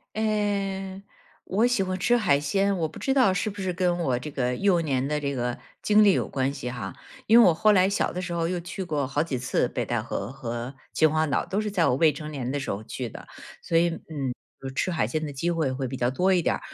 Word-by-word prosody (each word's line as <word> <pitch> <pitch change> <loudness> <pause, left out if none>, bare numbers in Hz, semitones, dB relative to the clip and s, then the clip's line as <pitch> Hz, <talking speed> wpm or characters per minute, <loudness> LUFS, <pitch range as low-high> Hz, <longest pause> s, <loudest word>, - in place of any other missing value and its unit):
哎， 200 -3 -1 0.4
我 215 +5 +1
喜 245 -5 +2
欢 185 0 -2
吃 240 +6 +3
海 185 -12 +3
鲜， 195 +7 +1
我 160 -2 0
不 155 - -11
知 270 - +1
道 255 -8 +4
是 205 +3 -1
不 205 0 -8
是 185 -1 -1
跟 175 -1 0
我 135 -8 +1
这 125 +5 -5
个 125 -3 -1
幼 185 +4 +2
年 135 -4 0
的 150 0 0
这 140 -1 -2
个 125 -1 -2 0.2
经 210 0 +5
历 200 - +6
有 - - 0
关 135 +1 -1
系 125 -3 -5
哈。 120 -6 -6 0.3
因 225 - +6
为 - - +8
我 - - +5
后 215 +6 +4
来 190 -1 +4
小 200 - 0
的 180 - -4
时 180 -1 -4
候， 170 -1 0
又 175 +1 -2
去 180 +2 -5
过 145 -5 -1
好 145 +3 0
几 145 -6 -3
次 130 +1 0
北 - - -2
戴 - - -1
河 100 +3 -4
和 120 -1 -5 0.2
秦 155 -1 +4
皇 155 0 +1
岛， 140 - +1
都 200 - -1
是 215 - -2
在 180 -7 +2
我 125 - +2
未 155 +1 +4
成 150 +1 -7
年 135 -5 -4
的 140 +2 -1
时 135 - -4
候 100 +2 -4
去 125 +2 -5
的。 - - -11 0.3
所 165 - -1
以， 170 +1 +4
嗯， 150 -5 -4 0.3
呃， 135 - -5
吃 140 +7 -1
海 160 -8 +1
鲜 155 +5 -2
的 145 - -6
机 155 +6 -1
会 160 -6 0
会 130 0 -3
比 130 - -5
较 120 -1 +1
多 185 +8 +2
一 180 - +4
点 - - +1
儿。 - - -4
165 Hz, 285 characters per minute, -26 LUFS, 135-190 Hz, 0.4 s, 为